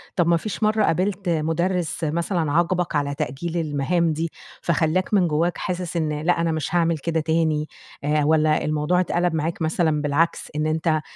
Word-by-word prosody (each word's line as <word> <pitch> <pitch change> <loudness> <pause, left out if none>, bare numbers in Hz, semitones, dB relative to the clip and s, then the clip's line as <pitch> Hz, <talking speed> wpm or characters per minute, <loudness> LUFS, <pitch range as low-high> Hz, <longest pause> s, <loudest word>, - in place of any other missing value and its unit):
طَب 175 -2 +2
ما 170 0 +4
فيش 215 +3 -4
مرَّة 215 0 +3
قابلت 185 +1 0
مُدرِّس 165 +2 -1
مثلًا 165 0 0
عاقبك 175 +1 +1
على 140 -1 0
تأجيل 170 +5 -3
المهام 160 +2 0
دي، 165 +1 -3 0.3
فخلّاك 170 +4 0
من 185 -4 +4
جواك 165 +3 0
حاسس 180 -2 -3
إن 150 -2 -1
لأ، 170 +1 +2
أنا 165 -1 +1
مش 160 +2 -2
هاعمل 170 -1 +2
كده 160 +2 -1
تاني؟ 160 -1 +1 0.4
آآ 150 0 +1
والّا 155 0 +3
الموضوع 155 +4 +1
اتقلَب 175 -1 +1
معاك 165 +2 -2
مثلًا 160 -1 +1
بالعكس، 150 +3 0
إن 155 +1 0
أنت 155 0 +1
165 Hz, 170 wpm, -23 LUFS, 155-175 Hz, 0.4 s, ما